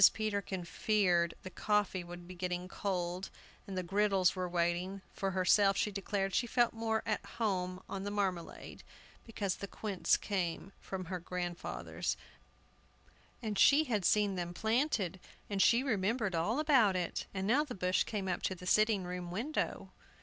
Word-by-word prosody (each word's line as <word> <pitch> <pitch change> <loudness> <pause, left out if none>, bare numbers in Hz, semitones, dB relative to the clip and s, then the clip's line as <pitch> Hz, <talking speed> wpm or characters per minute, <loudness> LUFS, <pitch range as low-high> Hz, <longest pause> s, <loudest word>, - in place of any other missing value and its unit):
Peterkin 200 -4 -2
feared 175 -3 +2
the 185 - -7
coffee 205 -3 0
would 175 0 -9
be 185 - -8
getting 180 0 -3
cold, 185 -1 -2 0.4
and 195 -1 -5
the 185 - -1
griddles 195 0 +2
were 185 -1 -2
waiting. 175 +3 -1
For 195 - -1
herself, 195 +2 +4
she 210 - +1
declared 195 -1 -2
she 240 - +1
felt 240 0 +2
more 225 -1 -1
at 215 - -1
home 185 -4 -2
on 195 - -4
the 205 - -2
marmalade, 195 -4 -3 0.5
because 200 -4 -2
the 200 - -5
quinces 200 -2 +1
came 185 -2 -2
from 190 -1 -5
grandfather's, 175 0 -3 1.3
and 210 -3 -2
she 290 +2 +7
had 220 -9 -1
seen 205 +2 +3
them 175 -1 -4
planted; 220 - 0 0.4
she 235 +5 +5
remembered 215 -3 0
all 170 +9 +1
about 265 -11 +4
it, 180 -2 -2
and 190 -1 -3
now 255 +8 +4
the 275 -5 -7
bush 185 -1 +2
came 200 -3 -3
up 180 - -1
to 190 - -1
the 180 - -11
sitting 215 0 +3
room 180 0 -5
window. 235 - -2
195 Hz, 155 wpm, -33 LUFS, 180-215 Hz, 1.3 s, she